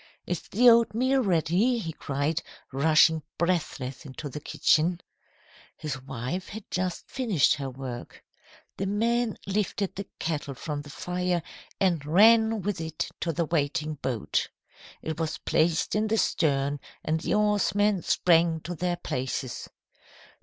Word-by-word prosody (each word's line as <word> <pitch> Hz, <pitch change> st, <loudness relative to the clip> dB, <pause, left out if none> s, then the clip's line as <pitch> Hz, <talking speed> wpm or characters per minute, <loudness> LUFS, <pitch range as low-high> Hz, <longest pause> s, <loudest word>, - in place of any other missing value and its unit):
"'Is 175 Hz, -, -2 dB
the 245 Hz, +5 st, +4 dB
oatmeal 235 Hz, +3 st, +5 dB
ready?' 190 Hz, +5 st, +2 dB
he 165 Hz, -8 st, -4 dB
cried, 145 Hz, +4 st, -1 dB, 0.3 s
rushing 155 Hz, +3 st, +4 dB, 0.2 s
breathless 165 Hz, -7 st, -1 dB
into 145 Hz, +1 st, -7 dB
the 150 Hz, -, -6 dB
kitchen. 165 Hz, +3 st, +2 dB, 0.8 s
"His 140 Hz, -4 st, -4 dB
wife 135 Hz, +7 st, -4 dB
had 215 Hz, +1 st, -7 dB
just 185 Hz, -1 st, -2 dB
finished 215 Hz, -, +2 dB
her 135 Hz, -2 st, -4 dB
work. 130 Hz, -2 st, -8 dB, 0.5 s
The 195 Hz, -, -2 dB
men 230 Hz, +3 st, +1 dB
lifted 200 Hz, 0 st, -1 dB
the 200 Hz, +1 st, -6 dB
kettle 150 Hz, -4 st, -3 dB
from 145 Hz, +2 st, -4 dB
the 145 Hz, -, -12 dB
fire 180 Hz, +2 st, -2 dB, 0.4 s
and 175 Hz, -6 st, +2 dB
ran 220 Hz, +6 st, +5 dB
with 200 Hz, -3 st, -2 dB
it 160 Hz, -1 st, -3 dB
to 165 Hz, -, -1 dB
the 165 Hz, +2 st, -1 dB
waiting 155 Hz, 0 st, 0 dB
boat. 120 Hz, -6 st, -1 dB, 0.5 s
It 160 Hz, 0 st, -4 dB
was 160 Hz, -1 st, -2 dB
placed 160 Hz, 0 st, +1 dB
in 215 Hz, +1 st, +1 dB
the 225 Hz, +1 st, +1 dB
stern 145 Hz, -6 st, +1 dB, 0.3 s
and 160 Hz, +1 st, +1 dB
the 160 Hz, -, 0 dB
oarsmen 205 Hz, -1 st, +2 dB
sprang 165 Hz, -2 st, +3 dB
to 175 Hz, -, -5 dB
their 175 Hz, +1 st, -1 dB
places. 130 Hz, -4 st, -4 dB
170 Hz, 140 wpm, -27 LUFS, 150-200 Hz, 0.8 s, oatmeal